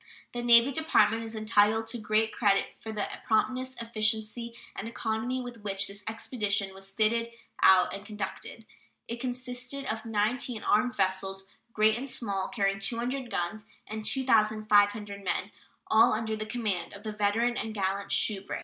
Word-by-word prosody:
The 240 Hz, -, -3 dB
Navy 240 Hz, +2 st, +6 dB
Department 230 Hz, -7 st, +3 dB
is 225 Hz, 0 st, -7 dB
entitled 215 Hz, 0 st, +3 dB
to 230 Hz, +1 st, -3 dB
great 215 Hz, +1 st, +1 dB
credit 200 Hz, -3 st, +2 dB
for 220 Hz, -, -7 dB
the 215 Hz, -, -2 dB, 0.2 s
promptness, 255 Hz, +3 st, 0 dB
efficiency, 225 Hz, +1 st, -1 dB, 0.2 s
and 205 Hz, -, -5 dB
economy 230 Hz, +3 st, -2 dB
with 240 Hz, -2 st, -9 dB
which 195 Hz, -1 st, -2 dB
this 200 Hz, +1 st, -9 dB
expedition 210 Hz, -3 st, -1 dB
was 195 Hz, 0 st, -6 dB
fitted 225 Hz, +3 st, +1 dB, 0.3 s
out 185 Hz, -1 st, +6 dB
and 200 Hz, -, -6 dB
conducted. 215 Hz, +1 st, -6 dB, 0.4 s
It 235 Hz, +1 st, -5 dB
consisted 250 Hz, +2 st, -4 dB
of 220 Hz, -3 st, -3 dB
19 225 Hz, +1 st, -1 dB
armed 245 Hz, +4 st, +2 dB
vessels, 195 Hz, 0 st, -1 dB, 0.3 s
great 220 Hz, +1 st, +3 dB
and 275 Hz, +2 st, -5 dB
small, 200 Hz, -6 st, -1 dB
carrying 195 Hz, -3 st, 0 dB
200 245 Hz, +5 st, -2 dB
guns 210 Hz, +3 st, -3 dB, 0.2 s
and 215 Hz, 0 st, -6 dB
2,500 215 Hz, -4 st, +2 dB
men, 185 Hz, +2 st, -2 dB, 0.3 s
all 220 Hz, -, +5 dB
under 220 Hz, 0 st, -1 dB
the 215 Hz, 0 st, -5 dB
command 215 Hz, -6 st, -2 dB
of 200 Hz, +1 st, -11 dB
the 215 Hz, -, -4 dB
veteran 210 Hz, +4 st, +1 dB
and 225 Hz, -, -3 dB
gallant 195 Hz, 0 st, -1 dB
Shubrick. 200 Hz, -2 st, +1 dB
220 Hz, 155 wpm, -29 LUFS, 205-235 Hz, 0.4 s, Navy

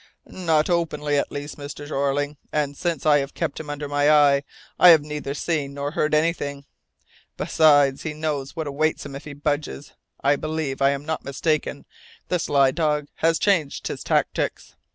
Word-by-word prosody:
"Not 160 Hz, -4 st, 0 dB
openly 150 Hz, -4 st, 0 dB
at -, -, -3 dB
least, 145 Hz, +1 st, -6 dB
Mr. 145 Hz, 0 st, -7 dB
Jeorling, 145 Hz, 0 st, -1 dB
and 145 Hz, -2 st, -1 dB
since 170 Hz, 0 st, -2 dB
I 150 Hz, -1 st, +5 dB
have 140 Hz, 0 st, -5 dB
kept -, -, -3 dB
him 155 Hz, -2 st, -8 dB
under 145 Hz, 0 st, -4 dB
my 145 Hz, +1 st, +2 dB
eye 145 Hz, -2 st, +5 dB, 0.4 s
I 180 Hz, -, +9 dB
have 160 Hz, -3 st, +7 dB
neither 150 Hz, -2 st, -5 dB
seen 150 Hz, -3 st, -2 dB
nor 140 Hz, 0 st, -3 dB
heard 155 Hz, 0 st, +1 dB
anything. 145 Hz, -3 st, -1 dB, 0.7 s
Besides, 145 Hz, -4 st, +4 dB
he 160 Hz, -, -4 dB
knows 150 Hz, -3 st, -3 dB
what 160 Hz, -2 st, -3 dB
awaits 150 Hz, +2 st, -1 dB
him 140 Hz, -1 st, -7 dB
if 140 Hz, -, -9 dB
he 150 Hz, -, -7 dB
budges. 145 Hz, -, -3 dB, 0.3 s
I 145 Hz, -, +3 dB
believe 155 Hz, -3 st, -3 dB
I 135 Hz, -, +5 dB
am 140 Hz, +1 st, -3 dB
not 160 Hz, 0 st, -3 dB
mistaken, 145 Hz, +1 st, -2 dB, 0.4 s
the 180 Hz, -, +1 dB
sly 140 Hz, -4 st, +3 dB
dog 150 Hz, -1 st, -1 dB
has 165 Hz, 0 st, +2 dB
changed 170 Hz, -9 st, 0 dB
his -, -, -5 dB
tactics. -, -, -1 dB
145 Hz, 175 wpm, -23 LUFS, 140-155 Hz, 0.7 s, I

